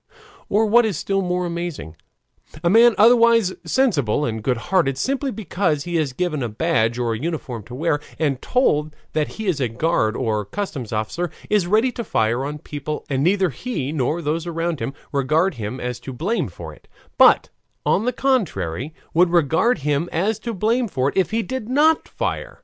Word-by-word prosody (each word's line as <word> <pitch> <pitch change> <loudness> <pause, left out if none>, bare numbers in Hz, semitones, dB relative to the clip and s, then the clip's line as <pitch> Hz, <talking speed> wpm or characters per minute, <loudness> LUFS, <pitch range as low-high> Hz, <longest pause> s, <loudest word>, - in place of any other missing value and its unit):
Or 215 +2 +3
what 235 +3 +5
is 210 -7 -1
still 195 +3 0
more 180 -1 -1
amazing; 170 - -5 0.7
a 170 - +3
man, 230 +1 +6
otherwise 230 -3 +5
sensible 150 - +1
and 110 -1 -3
good 125 +2 0
hearted, 135 0 +1
simply 275 - -1
because 180 - -1
he 175 -1 -4
is 150 -4 0
given 155 +1 -2
a 120 - -2
badge 115 -2 +1
or 120 -2 0
a 110 - -4
uniform 145 -6 -4
to 120 - -9
wear, 150 +1 0 0.2
and 140 -5 0
told 155 - +1 0.2
that 155 -1 +1
he 220 - -4
is 180 -7 0
a 125 - +2
guard 115 -3 0
or 110 -4 -1
customs 130 - -5
officer, 110 +12 -2 0.2
is 205 -4 +3
ready 220 +7 +3
to 235 - -5
fire 115 - 0
on 145 +2 -4
people, 150 +1 -6
and 135 0 +1
neither 190 0 +2
he 145 - -4
nor 155 +3 -1
those 160 +3 -2
around 165 -2 -2
him 125 +5 -4 0.2
regard 155 +7 +1
him 110 +5 -4
as 125 0 -4
to 135 - -8
blame 190 - -1
for - - -9
it, - - -20 0.3
but, - - +6 0.4
on 215 - +2
the 250 - +2
contrary, 160 - -1 0.2
would 175 +2 +4
regard 170 - +3
him 150 +3 0
as 200 +6 0
to 235 - -4
blame 230 +4 +1 0.2
if 190 - +1
he 225 +1 0
did 255 -2 -5
not 305 +4 +3
fire. - - -4
165 Hz, 185 wpm, -21 LUFS, 135-210 Hz, 0.7 s, man